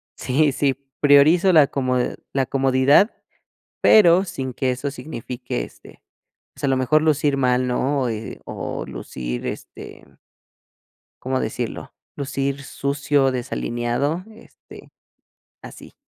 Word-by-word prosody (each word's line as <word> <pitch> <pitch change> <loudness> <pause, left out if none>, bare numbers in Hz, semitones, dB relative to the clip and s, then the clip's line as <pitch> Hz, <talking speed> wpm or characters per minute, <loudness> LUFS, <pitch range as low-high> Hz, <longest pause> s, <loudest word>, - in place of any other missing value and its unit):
sí, 145 +3 +1
sí, 135 0 0 0.2
priorizo 150 +6 +5
la 155 -4 +6
comod 130 -3 -1 0.2
la 135 -1 +1
comodidad, 135 - +3 0.7
pero 185 -3 +6
sin 135 -9 -5
que 130 0 0
eso 130 +3 -4
signifique, 125 - -6
este, - - -16 0.5
pues - - -15
a - - +2
lo 135 -1 +2
mejor 140 +4 +2
lucir 150 -2 +1
mal, 125 -1 +2
¿no? 135 +3 0
O, 125 - -1
eh, 110 -1 -6
o, - - -5
lucir, - - -6
este - - -9 1.2
¿cómo 130 +1 -1
decirlo?, - - -4 0.2
lucir 140 0 -3
sucio, 140 0 0
desalineado, 125 +5 -2
este, 225 - -16 0.7
así. - - -12
135 Hz, 120 wpm, -22 LUFS, 125-145 Hz, 1.2 s, la